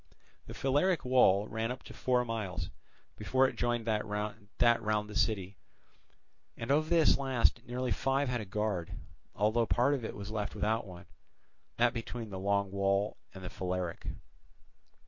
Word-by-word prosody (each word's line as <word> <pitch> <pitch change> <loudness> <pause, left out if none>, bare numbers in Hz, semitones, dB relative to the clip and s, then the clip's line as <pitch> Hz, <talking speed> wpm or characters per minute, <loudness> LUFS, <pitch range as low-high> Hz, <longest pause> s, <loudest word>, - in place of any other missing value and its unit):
The - - -8
Phaleric 145 +6 +1
wall 105 -6 +4
ran 115 +3 -2
for - - -13
four 125 -1 +1
miles, 95 -8 -3 0.5
before 130 +5 +3
it - - -5
joined 120 -1 0
that 110 -2 +1
round 105 +1 0
the 105 - -9
city; 100 -3 0 1.0
and 115 +3 -3
of 155 +2 +2
this 165 -5 +5
last 130 -3 +2
nearly 125 0 -2
five 135 +6 +1
had 125 -2 -1
a - - -6
guard, 100 -3 -2 0.4
although 110 +3 +2
part 130 +4 +3
of 135 -4 -2
it - - -5
was 100 +1 -7
left 105 -2 -3
without 110 0 0
one, 90 -2 -10
viz., - - -28 0.6
that 120 0 +4
between 115 -1 -5
the 95 - -5
Long 100 0 +1
Wall 100 +1 +1 0.2
and 95 - -9
the 90 - -5
Phaleric. 90 -2 -3
110 Hz, 160 wpm, -32 LUFS, 100-125 Hz, 1.0 s, this